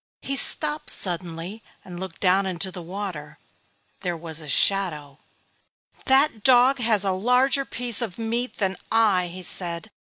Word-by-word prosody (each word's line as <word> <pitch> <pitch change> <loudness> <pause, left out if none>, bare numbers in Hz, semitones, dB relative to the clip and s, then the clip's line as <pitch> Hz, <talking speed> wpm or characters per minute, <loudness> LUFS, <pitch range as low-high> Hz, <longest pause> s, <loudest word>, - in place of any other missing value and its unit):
He 275 - -2
stopped 300 +2 +3
suddenly 175 +3 -3 0.2
and 175 -2 -9
looked 190 -2 -8
down 190 +1 +3
into 185 +1 -4
the 180 - -8
water. 170 -5 -7 0.6
There 175 -2 -3
was 160 -1 -2
his 150 -3 -6
shadow. 150 -8 0 0.9
"That 270 -3 +3
dog 255 +1 +5
has 220 -4 +2
a 195 - 0
larger 250 +8 +2
piece 245 -4 0
of 220 -7 -4
meat 235 +2 -3
than 190 -3 -1
I," 210 -5 +3
he 180 +2 -8
said. 175 +3 -3
195 Hz, 150 wpm, -24 LUFS, 175-235 Hz, 0.9 s, dog